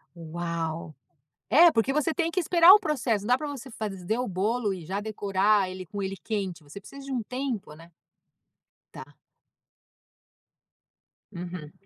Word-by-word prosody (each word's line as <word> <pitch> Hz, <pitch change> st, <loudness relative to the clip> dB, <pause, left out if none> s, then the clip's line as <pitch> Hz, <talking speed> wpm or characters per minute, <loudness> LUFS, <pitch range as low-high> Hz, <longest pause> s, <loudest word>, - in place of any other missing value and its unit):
Uau. 165 Hz, -1 st, -4 dB, 0.5 s
É, 335 Hz, +3 st, +7 dB
porque 230 Hz, +4 st, +1 dB
você 300 Hz, +2 st, +1 dB
tem 335 Hz, -2 st, 0 dB
que 365 Hz, -, -1 dB
esperar 345 Hz, +2 st, +7 dB
o 420 Hz, -, +7 dB
processo, 255 Hz, -, -1 dB
não 240 Hz, -, -1 dB
dá -, -, +4 dB
pra 300 Hz, -, -5 dB
você 270 Hz, -3 st, -7 dB
fazer 210 Hz, -1 st, -3 dB
o 250 Hz, -, -1 dB
bolo 205 Hz, +3 st, 0 dB
e 175 Hz, -4 st, -8 dB
já 195 Hz, +4 st, -3 dB
decorar 205 Hz, -1 st, +1 dB
ele 185 Hz, 0 st, -7 dB
com 200 Hz, +3 st, -5 dB
ele 195 Hz, 0 st, -4 dB
quente, 195 Hz, -5 st, -3 dB
você 150 Hz, +6 st, -11 dB
precisa 275 Hz, +7 st, -12 dB
de 275 Hz, -, -7 dB
um 245 Hz, -3 st, -1 dB
tempo, 250 Hz, -, -4 dB
né. 165 Hz, +2 st, -15 dB, 1.0 s
Tá. -, -, -11 dB, 2.2 s
Uhum. 175 Hz, -4 st, -7 dB
205 Hz, 155 wpm, -27 LUFS, 180-265 Hz, 2.2 s, É